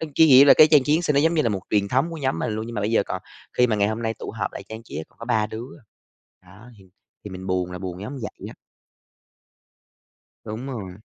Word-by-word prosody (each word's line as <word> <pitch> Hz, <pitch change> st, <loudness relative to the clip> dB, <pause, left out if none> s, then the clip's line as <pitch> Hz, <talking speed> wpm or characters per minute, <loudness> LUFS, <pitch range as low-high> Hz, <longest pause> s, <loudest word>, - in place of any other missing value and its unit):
cái 160 Hz, -, +6 dB
nghĩa 135 Hz, 0 st, +8 dB
là -, -, +9 dB
cái 155 Hz, -, +7 dB
trang 150 Hz, -3 st, +5 dB
trí 145 Hz, -, +1 dB
Giáng 170 Hz, -, 0 dB
Sinh 150 Hz, -3 st, 0 dB
nó 140 Hz, -, +4 dB
giống 160 Hz, +3 st, +2 dB
như 160 Hz, -, +2 dB
là 115 Hz, -, 0 dB
một 100 Hz, -2 st, -3 dB
truyền 100 Hz, -2 st, +1 dB
thống 135 Hz, +9 st, +1 dB
của 165 Hz, -, -7 dB
nhóm 135 Hz, -2 st, -1 dB
mình 115 Hz, -, -2 dB
luôn, 110 Hz, +1 st, -4 dB
nhưng 120 Hz, -, -7 dB
mà 105 Hz, -, -2 dB
bây 105 Hz, +3 st, -1 dB
giờ 105 Hz, -, +3 dB
còn 95 Hz, -, -5 dB, 0.4 s
khi 125 Hz, 0 st, +5 dB
mà 110 Hz, -, 0 dB
ngày 100 Hz, 0 st, +2 dB
hôm 110 Hz, +2 st, -3 dB
nay 115 Hz, -1 st, -1 dB
tụ -, -, -8 dB
họp -, -, -4 dB
lại -, -, -8 dB
trang 110 Hz, +1 st, -8 dB
trí 75 Hz, -, -9 dB
á, 80 Hz, -, -4 dB
còn 115 Hz, -, -12 dB
3 110 Hz, -3 st, +1 dB
đứa 110 Hz, +3 st, -7 dB
à. -, -, -22 dB, 0.8 s
Đó, 115 Hz, +3 st, -15 dB
thì 95 Hz, -, -17 dB, 0.4 s
thì 105 Hz, -, -7 dB
mình 95 Hz, 0 st, -8 dB
buồn 90 Hz, -1 st, -1 dB
là 90 Hz, -, -6 dB
buồn 90 Hz, -1 st, -6 dB
giống 120 Hz, +7 st, -6 dB
vậy 105 Hz, -, -7 dB
á. -, -, -11 dB, 1.9 s
Đúng 110 Hz, +5 st, -6 dB
rồi. 100 Hz, -9 st, -6 dB
110 Hz, 275 wpm, -23 LUFS, 100-135 Hz, 1.9 s, là